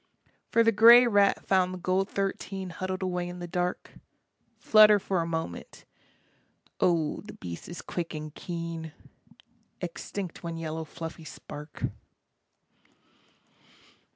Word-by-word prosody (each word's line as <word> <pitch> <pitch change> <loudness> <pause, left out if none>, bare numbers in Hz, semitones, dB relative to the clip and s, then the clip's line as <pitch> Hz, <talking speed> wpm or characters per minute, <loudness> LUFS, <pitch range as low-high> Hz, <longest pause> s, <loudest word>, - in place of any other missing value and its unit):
For 230 - +4
the 225 - +4
grey 235 +3 +9
rat 205 -4 +3
found 185 -1 +2
the - - -6
gold 185 +2 0
thirteen 195 -1 -3
Huddled 185 +2 -4
away 180 -1 -2
in 180 - -7
the 175 - -6
dark, 180 0 -2 0.7
Flutter 215 -1 +7
for 190 -2 -1
a 165 - -3
moment, 160 - -5 0.9
oh 165 -4 +1
the 210 - -10
beast 85 -2 -8
is 175 - -7
quick 170 -2 -4
and 155 -1 -6
keen, 165 -2 -6 0.9
Extinct 180 +1 -6
one 170 -1 -5
yellow 160 0 -4
fluffy 165 +1 -8
spark. 150 +1 -10
180 Hz, 125 wpm, -28 LUFS, 165-195 Hz, 0.9 s, grey